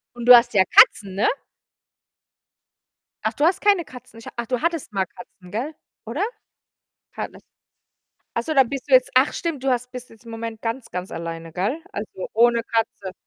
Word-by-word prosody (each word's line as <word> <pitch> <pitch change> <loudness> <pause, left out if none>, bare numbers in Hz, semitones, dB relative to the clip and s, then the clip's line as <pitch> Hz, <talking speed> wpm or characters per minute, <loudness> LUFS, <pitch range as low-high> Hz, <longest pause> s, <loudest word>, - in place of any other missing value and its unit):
Und 240 -1 -6
du 250 - +12
hast 240 0 +4
ja 190 - +5
Katzen, 195 0 +5
ne? 200 - +2 2.0
Ach, - - +2
du 295 - +1
hast 375 +3 +2
keine 400 -6 +3
Katzen, 250 -2 -13
ich 230 - -14
ach, 235 0 -3
du 250 0 -2
hattest 335 -8 -2
mal 195 -2 0
Katzen, 180 0 -15
gell? 250 - -4 0.3
Oder? 240 - -4 1.0
Ha - - -2
lass - - -16 0.9
ach 235 - 0
so, 315 - -3
dann 265 -4 +5
bist 275 +1 -6
du 270 - +4
jetzt 255 0 +5
ach, 260 +3 +4
stimmt, 330 -6 -4
du 270 - +2
hast 250 0 -1
bist 250 0 -8
jetzt 225 +1 -18
im 230 - -11
Moment 225 -1 -6
ganz, 230 +2 -4
ganz 180 +1 -5
alleine, 165 -1 -6
gell? 210 - -2
Also, 205 -2 -6
ohne 235 +1 +4
Katze. 225 -5 -2
235 Hz, 190 wpm, -22 LUFS, 205-260 Hz, 2.0 s, du